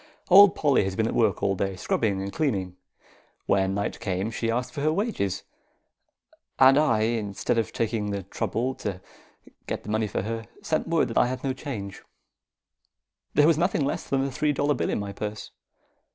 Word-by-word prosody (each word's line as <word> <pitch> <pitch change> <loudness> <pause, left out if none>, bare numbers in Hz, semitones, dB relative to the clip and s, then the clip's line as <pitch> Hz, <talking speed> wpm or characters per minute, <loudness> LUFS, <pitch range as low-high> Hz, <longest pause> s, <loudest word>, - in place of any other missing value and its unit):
Old 200 +1 +8
Polly 140 -7 +3
has 95 0 -3
been 110 - +1
at - - -1
work 105 -6 +1
all 95 -1 +2
day, 95 0 -2
scrubbing 95 +1 -1
and 100 - -5
cleaning. 95 - -1 0.7
When 95 0 +1
night 100 - -3
came, 95 0 -2
she 115 0 -2
asked 125 +2 -2
for 140 - -4
her 155 +2 +2
wages, 165 - -1 1.1
and 135 0 +7
I, 140 -8 +3
instead 110 0 0
of 115 - -2
taking 110 -2 -1
the 100 -1 -3
trouble 115 +6 -2
to 95 -3 -3 0.7
get - - -4
the - - -9
money 110 0 0
for 100 - -3
her, 115 +1 -4 0.2
sent 155 - 0
her - - -9
word 165 -5 +2
that 115 - +1
I - - +4
hadn't 130 +2 -4
the 130 - 0
change. 110 -9 -6 1.3
There 145 - +6
was 160 -1 +4
nothing 170 -4 +1
less 140 - -2
than 135 -1 +1
a 140 - -3
three 150 +3 0
dollar 145 +1 +1
bill - - -2
in - - -1
my 100 -1 -5
purse. 105 +1 -6
115 Hz, 195 wpm, -26 LUFS, 100-140 Hz, 1.3 s, Old